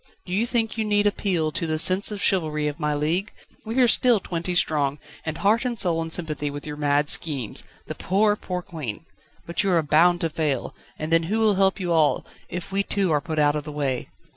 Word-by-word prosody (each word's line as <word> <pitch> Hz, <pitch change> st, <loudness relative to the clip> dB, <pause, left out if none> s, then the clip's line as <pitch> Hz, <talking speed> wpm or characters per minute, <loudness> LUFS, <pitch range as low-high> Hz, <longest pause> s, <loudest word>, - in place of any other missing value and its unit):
Do 180 Hz, -, -6 dB
you 220 Hz, +5 st, +1 dB
think 225 Hz, -2 st, -1 dB
you -, -, +2 dB
need 205 Hz, -1 st, +1 dB
appeal 180 Hz, -6 st, 0 dB
to 165 Hz, -, -1 dB
the 155 Hz, 0 st, -1 dB
sense 185 Hz, +5 st, +5 dB
of 205 Hz, -2 st, -4 dB
chivalry 155 Hz, -6 st, +1 dB
of 150 Hz, +2 st, -4 dB
my 150 Hz, -1 st, 0 dB
league? 165 Hz, +8 st, 0 dB, 0.4 s
We 225 Hz, -, -3 dB
are 245 Hz, -, +6 dB
still 235 Hz, -1 st, +4 dB
twenty 175 Hz, -1 st, -3 dB
strong, 145 Hz, -4 st, +1 dB, 0.3 s
and 160 Hz, -, -3 dB
heart 215 Hz, +4 st, +2 dB
and 245 Hz, -2 st, -2 dB
soul 170 Hz, -4 st, +1 dB
in 165 Hz, -, -4 dB
sympathy 155 Hz, -3 st, -2 dB
with 145 Hz, 0 st, -7 dB
your 150 Hz, -1 st, -5 dB
mad 145 Hz, 0 st, +1 dB
schemes. 140 Hz, -9 st, 0 dB, 0.2 s
The -, -, -5 dB
poor, 205 Hz, +2 st, +1 dB
poor 180 Hz, -3 st, -5 dB
Queen! 155 Hz, -5 st, -6 dB, 0.4 s
But 170 Hz, -, -1 dB
you 200 Hz, -, 0 dB
are 170 Hz, -3 st, +3 dB
bound 170 Hz, +4 st, +3 dB
to 165 Hz, -, 0 dB
fail, 150 Hz, -5 st, -2 dB, 0.2 s
and 155 Hz, +1 st, -5 dB
then 165 Hz, -, +5 dB
who 215 Hz, -, 0 dB
will 220 Hz, -2 st, +3 dB
help 195 Hz, +1 st, +2 dB
you 180 Hz, -2 st, -2 dB
all, 160 Hz, -3 st, +2 dB, 0.2 s
if 175 Hz, +2 st, -6 dB
we 195 Hz, +1 st, +1 dB
too 200 Hz, -3 st, -1 dB
are 150 Hz, -2 st, +2 dB
put 160 Hz, -1 st, -5 dB
out 145 Hz, -1 st, +3 dB
of 150 Hz, -, -3 dB
the 150 Hz, -, -7 dB
way?" 140 Hz, -4 st, -2 dB
165 Hz, 230 wpm, -24 LUFS, 150-195 Hz, 0.4 s, are